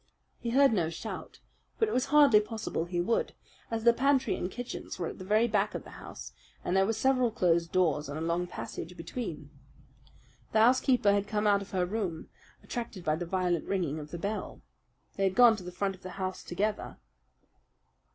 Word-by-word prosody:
He 235 Hz, -, -3 dB
heard 270 Hz, +1 st, +5 dB
no 170 Hz, -6 st, +1 dB
shot; 165 Hz, -, -7 dB, 0.4 s
but 445 Hz, -, +2 dB
it -, -, -3 dB
was 255 Hz, -, +2 dB
hardly 285 Hz, -7 st, +6 dB
possible 215 Hz, -5 st, -3 dB
he 175 Hz, 0 st, -3 dB
would, 205 Hz, +7 st, 0 dB, 0.4 s
as 225 Hz, -1 st, -2 dB
the 235 Hz, 0 st, +6 dB
pantry 270 Hz, +1 st, +2 dB
and 180 Hz, -, -3 dB
kitchens 245 Hz, +4 st, -6 dB
were 175 Hz, -, -2 dB
at -, -, -10 dB
the -, -, -6 dB
very 215 Hz, +4 st, +3 dB
back 210 Hz, -1 st, 0 dB
of -, -, -4 dB
the -, -, -13 dB
house -, -, -9 dB, 0.3 s
and 180 Hz, -, 0 dB
there 190 Hz, 0 st, +4 dB
were 225 Hz, -, +1 dB
several 255 Hz, +2 st, +2 dB
closed 170 Hz, -6 st, +1 dB
doors 155 Hz, -5 st, +1 dB
and 145 Hz, -, -4 dB
a -, -, -4 dB
long 170 Hz, +2 st, 0 dB
passage 175 Hz, 0 st, -7 dB
between. 165 Hz, -, -6 dB, 1.0 s
The 220 Hz, -, +4 dB
housekeeper 245 Hz, -3 st, +4 dB
had 200 Hz, 0 st, 0 dB
come 215 Hz, 0 st, -1 dB
out 200 Hz, -1 st, +4 dB
of 200 Hz, -, -9 dB
her 185 Hz, -2 st, 0 dB
room, 180 Hz, -5 st, -3 dB, 0.3 s
attracted 225 Hz, -7 st, -6 dB
by 155 Hz, -, +2 dB
the 175 Hz, +1 st, -5 dB
violent 180 Hz, -2 st, 0 dB
ringing 170 Hz, -6 st, -1 dB
of 150 Hz, 0 st, -8 dB
the 170 Hz, -, -6 dB
bell. 205 Hz, +5 st, -4 dB, 0.5 s
They 195 Hz, -, 0 dB
had 190 Hz, -1 st, +1 dB
gone 240 Hz, -2 st, +7 dB
to 190 Hz, -, -8 dB
the 180 Hz, -, -7 dB
front 195 Hz, +2 st, -1 dB
of 185 Hz, -, -15 dB
the 185 Hz, -, -7 dB
house 185 Hz, -1 st, -3 dB
together. 205 Hz, +4 st, -2 dB
195 Hz, 200 wpm, -30 LUFS, 175-225 Hz, 1.0 s, gone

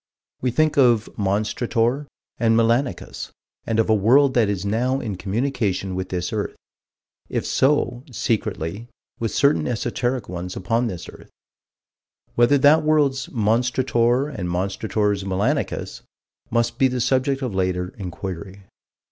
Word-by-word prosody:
We 125 Hz, -, +1 dB
think 155 Hz, +5 st, +1 dB
of 120 Hz, -4 st, +4 dB
Monstrator 115 Hz, +6 st, 0 dB, 0.3 s
and 115 Hz, -1 st, +3 dB
Melanicus 115 Hz, -2 st, 0 dB, 0.4 s
and 115 Hz, -1 st, 0 dB
of 115 Hz, -, +3 dB
a 110 Hz, -, +4 dB
world 130 Hz, +7 st, +4 dB
that 115 Hz, -5 st, +3 dB
is 100 Hz, -1 st, -2 dB
now 125 Hz, +6 st, 0 dB
in 110 Hz, -7 st, -4 dB
communication 100 Hz, -2 st, -1 dB
with 95 Hz, 0 st, -4 dB
this 90 Hz, +1 st, -3 dB
earth: 105 Hz, -2 st, -2 dB, 0.7 s
if -, -, -2 dB
so, 130 Hz, -3 st, +1 dB
secretly, 110 Hz, -3 st, -2 dB, 0.3 s
with 115 Hz, -, -1 dB
certain 145 Hz, +5 st, +2 dB
esoteric 125 Hz, 0 st, -2 dB
ones 90 Hz, +1 st, -5 dB
upon 115 Hz, +5 st, 0 dB
this 90 Hz, -6 st, -6 dB
earth. -, -, -13 dB, 1.0 s
Whether 120 Hz, +4 st, +4 dB
that 145 Hz, +4 st, +6 dB
world's 150 Hz, -3 st, +2 dB
Monstrator 120 Hz, +3 st, +1 dB
and 90 Hz, -4 st, -3 dB
Monstrator's 100 Hz, +2 st, -1 dB
Melanicus 95 Hz, +1 st, -1 dB, 0.5 s
must 115 Hz, 0 st, 0 dB
be 135 Hz, -, +5 dB
the 125 Hz, -1 st, -2 dB
subject 135 Hz, +2 st, +1 dB
of 125 Hz, -5 st, -2 dB
later 90 Hz, -1 st, -1 dB
inquiry. 95 Hz, 0 st, -7 dB
115 Hz, 130 wpm, -22 LUFS, 100-130 Hz, 1.0 s, that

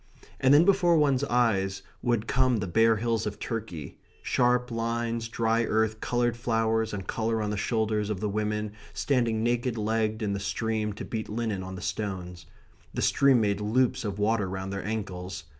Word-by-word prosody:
And 130 Hz, -, +4 dB
then 150 Hz, +4 st, +7 dB
before 180 Hz, -4 st, +4 dB
one's 140 Hz, -3 st, +3 dB
eyes 105 Hz, -7 st, +1 dB, 0.2 s
would 120 Hz, -3 st, 0 dB
come 130 Hz, 0 st, +2 dB
the 105 Hz, -, -2 dB
bare 115 Hz, +5 st, +4 dB
hills 115 Hz, 0 st, -1 dB
of 105 Hz, -, -4 dB
Turkey 105 Hz, -, -5 dB, 0.2 s
sharp 125 Hz, 0 st, +2 dB
lines, 115 Hz, 0 st, -2 dB
dry 115 Hz, 0 st, +1 dB
earth, 110 Hz, 0 st, +1 dB
coloured 120 Hz, -1 st, +1 dB
flowers, 115 Hz, -1 st, 0 dB
and 100 Hz, -3 st, -5 dB
colour 115 Hz, +2 st, -1 dB
on 105 Hz, -1 st, -1 dB
the -, -, -1 dB
shoulders 110 Hz, 0 st, 0 dB
of 105 Hz, -3 st, -2 dB
the 105 Hz, -, -1 dB
women, 105 Hz, 0 st, -2 dB, 0.2 s
standing 120 Hz, -5 st, +1 dB
naked 120 Hz, 0 st, 0 dB
legged 110 Hz, 0 st, 0 dB
in 100 Hz, -1 st, 0 dB
the 100 Hz, -, -2 dB
stream 110 Hz, +1 st, -1 dB
to 105 Hz, -, -7 dB
beat 110 Hz, -1 st, -4 dB
linen 110 Hz, -3 st, -2 dB
on 95 Hz, 0 st, -6 dB
the 90 Hz, -, -8 dB
stones. 90 Hz, -4 st, -4 dB, 0.5 s
The -, -, -1 dB
stream 135 Hz, -3 st, +4 dB
made 100 Hz, -1 st, 0 dB
loops 125 Hz, +4 st, +1 dB
of 100 Hz, -3 st, -3 dB
water 105 Hz, -1 st, +1 dB
round 95 Hz, +1 st, -4 dB
their 100 Hz, -, -4 dB
ankles. 95 Hz, -4 st, -4 dB
110 Hz, 180 wpm, -27 LUFS, 105-120 Hz, 0.5 s, then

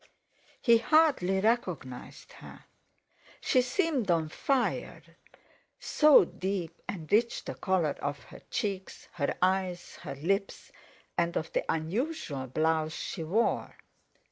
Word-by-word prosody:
He 235 Hz, -2 st, +5 dB
hardly 260 Hz, -, +3 dB
recognised 180 Hz, -, -2 dB
her. -, -, -13 dB, 0.7 s
She 255 Hz, -, +3 dB
seemed 260 Hz, -, 0 dB
on 165 Hz, -2 st, +2 dB
fire, 260 Hz, -, -1 dB, 0.8 s
so 300 Hz, -, +6 dB
deep 180 Hz, -2 st, -4 dB
and 165 Hz, -6 st, -5 dB
rich 235 Hz, +3 st, +2 dB
the -, -, -4 dB
colour 175 Hz, -6 st, 0 dB
of 145 Hz, 0 st, -3 dB
her -, -, -13 dB
cheeks, 195 Hz, -4 st, -4 dB
her 140 Hz, -3 st, -1 dB
eyes, 185 Hz, -2 st, 0 dB
her -, -, -7 dB
lips, 195 Hz, +8 st, -2 dB, 0.5 s
and 170 Hz, 0 st, +1 dB
of 160 Hz, -, -4 dB
the -, -, +1 dB
unusual 165 Hz, -, -2 dB
blouse 155 Hz, +3 st, 0 dB
she 165 Hz, -, -5 dB
wore. 205 Hz, +9 st, 0 dB
185 Hz, 115 wpm, -29 LUFS, 160-235 Hz, 0.8 s, so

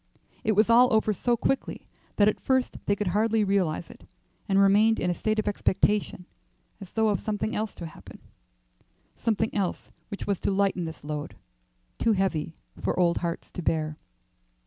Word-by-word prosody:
It 215 Hz, -, +2 dB
was 215 Hz, +2 st, +4 dB
all 240 Hz, +2 st, +6 dB
over 220 Hz, -1 st, +3 dB
so 240 Hz, +4 st, 0 dB
quickly 270 Hz, +3 st, -2 dB, 0.3 s
that 205 Hz, -, +4 dB
at 215 Hz, -, +1 dB
first 260 Hz, -1 st, 0 dB
they 200 Hz, -, +3 dB
could 205 Hz, -2 st, -2 dB
hardly 215 Hz, +3 st, +2 dB
realize 190 Hz, -5 st, 0 dB
it, -, -, -16 dB, 0.5 s
and 195 Hz, -, +3 dB
remained 205 Hz, +3 st, +4 dB
in 180 Hz, -, 0 dB
a -, -, +1 dB
state 215 Hz, +4 st, -1 dB
of 215 Hz, -, -1 dB
expectation 205 Hz, -2 st, 0 dB, 0.5 s
as 195 Hz, -3 st, -11 dB
though 220 Hz, -1 st, +2 dB
of 200 Hz, -3 st, +1 dB
something 215 Hz, 0 st, -2 dB
else 215 Hz, -1 st, -3 dB
to 170 Hz, -, -7 dB
happen 160 Hz, -, -12 dB, 1.0 s
something 220 Hz, -1 st, -1 dB
else 195 Hz, -4 st, -2 dB, 0.2 s
which 200 Hz, -, -6 dB
was 200 Hz, -3 st, -1 dB
to -, -, -1 dB
lighten 195 Hz, -3 st, +1 dB
this 160 Hz, -2 st, -8 dB
load, 150 Hz, 0 st, -5 dB, 0.6 s
too 225 Hz, -, +3 dB
heavy 170 Hz, -5 st, -1 dB, 0.2 s
for -, -, -1 dB
old 170 Hz, -1 st, +3 dB
hearts 170 Hz, -1 st, -4 dB
to -, -, -6 dB
bear. 155 Hz, -2 st, -1 dB
200 Hz, 175 wpm, -27 LUFS, 180-220 Hz, 1.0 s, all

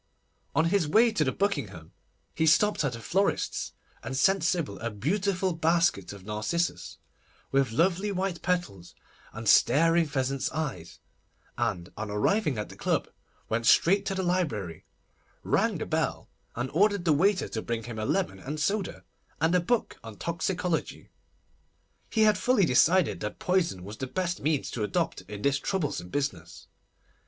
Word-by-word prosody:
On 160 Hz, +2 st, +3 dB
his 170 Hz, -2 st, +2 dB
way 225 Hz, +9 st, +5 dB
to 155 Hz, -, +1 dB
the 130 Hz, -, 0 dB
Buckingham, 100 Hz, -, -2 dB, 0.4 s
he 160 Hz, -, +1 dB
stopped 205 Hz, +4 st, +4 dB
at 135 Hz, -4 st, -1 dB
a -, -, -8 dB
florist's, 195 Hz, -, -1 dB, 0.3 s
and 130 Hz, -, -4 dB
sent 195 Hz, +7 st, +3 dB
Sybil 150 Hz, -, -1 dB
a 115 Hz, -, -3 dB
beautiful 185 Hz, -, -1 dB
basket 165 Hz, -, +1 dB
of 100 Hz, -2 st, -11 dB
narcissus, 110 Hz, +12 st, -2 dB, 0.5 s
with 135 Hz, -3 st, +2 dB
lovely 185 Hz, -, +1 dB
white 190 Hz, -2 st, -2 dB
petals 170 Hz, -, -2 dB, 0.4 s
and 115 Hz, +1 st, -7 dB
staring 165 Hz, +8 st, +5 dB
pheasants' 135 Hz, -1 st, -1 dB
eyes, 135 Hz, -, -4 dB, 0.6 s
and 85 Hz, 0 st, -2 dB
on 110 Hz, 0 st, -5 dB
arriving 150 Hz, -, +1 dB
at 105 Hz, -, -4 dB
the -, -, -11 dB
club, -, -, -1 dB, 0.4 s
went 115 Hz, +2 st, -1 dB
straight 195 Hz, +7 st, +5 dB
to 195 Hz, -, -1 dB
the 190 Hz, -, -1 dB
library, 125 Hz, -, -2 dB, 0.6 s
rang -, -, +1 dB
the -, -, -4 dB
bell, -, -, -2 dB, 0.2 s
and 125 Hz, +2 st, -3 dB
ordered 200 Hz, +1 st, +2 dB
the 160 Hz, -, +4 dB
waiter 190 Hz, +6 st, +2 dB
to 110 Hz, -, -3 dB
bring 115 Hz, 0 st, -3 dB
him 115 Hz, -1 st, -6 dB
a 110 Hz, -, -2 dB
lemon 95 Hz, -2 st, -1 dB
and 150 Hz, +9 st, -5 dB
soda, 200 Hz, +4 st, -1 dB, 0.4 s
and 160 Hz, +2 st, +2 dB
a 180 Hz, -, +5 dB
book 220 Hz, +7 st, -1 dB
on 110 Hz, -2 st, -10 dB
Toxicology. 170 Hz, +1 st, -2 dB, 1.0 s
He 220 Hz, -, +1 dB
had 210 Hz, -3 st, +4 dB
fully 250 Hz, -7 st, +3 dB
decided 165 Hz, +7 st, +3 dB
that -, -, -5 dB
poison 175 Hz, -, 0 dB
was 105 Hz, +3 st, -8 dB
the 130 Hz, -, -4 dB
best 180 Hz, +4 st, -2 dB
means 150 Hz, -1 st, -1 dB
to 115 Hz, -, -4 dB
adopt 105 Hz, -, -1 dB
in 105 Hz, -1 st, -7 dB
this 140 Hz, -1 st, +2 dB
troublesome 145 Hz, -, -2 dB
business. 90 Hz, -, -4 dB
155 Hz, 160 wpm, -28 LUFS, 115-185 Hz, 1.0 s, way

